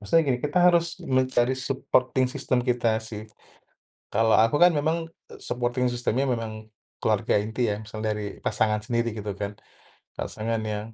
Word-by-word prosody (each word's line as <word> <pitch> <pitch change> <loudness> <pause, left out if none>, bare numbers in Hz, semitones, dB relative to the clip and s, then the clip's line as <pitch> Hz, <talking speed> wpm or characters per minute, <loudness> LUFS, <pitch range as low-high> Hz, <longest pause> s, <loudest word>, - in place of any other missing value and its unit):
Maksudnya 135 +11 +3
gini, 125 -2 +2
kita 150 +5 0
harus 175 0 +3
mencari 130 -2 +1
supporting 130 -1 +1
system 130 -1 -1
kita 120 -3 +1
sih. 110 -1 -7 0.9
Kalau 115 0 +4
aku 115 +6 +4
kan 175 0 +8
memang 160 +2 0 0.3
supporting 125 +1 -1
system-nya 120 +2 0
memang 110 -2 -4 0.3
keluarga - - +2
inti 110 +3 -1
ya, 105 - -6
misal 110 0 -8
dari 105 -1 -3
pasangan 105 -1 +1
sendiri, 115 0 0
gitu 105 -1 -4
kan. 100 0 -4 0.6
Pasangan 115 +1 -3
yang 105 +1 -4
120 Hz, 150 wpm, -26 LUFS, 110-130 Hz, 0.9 s, kan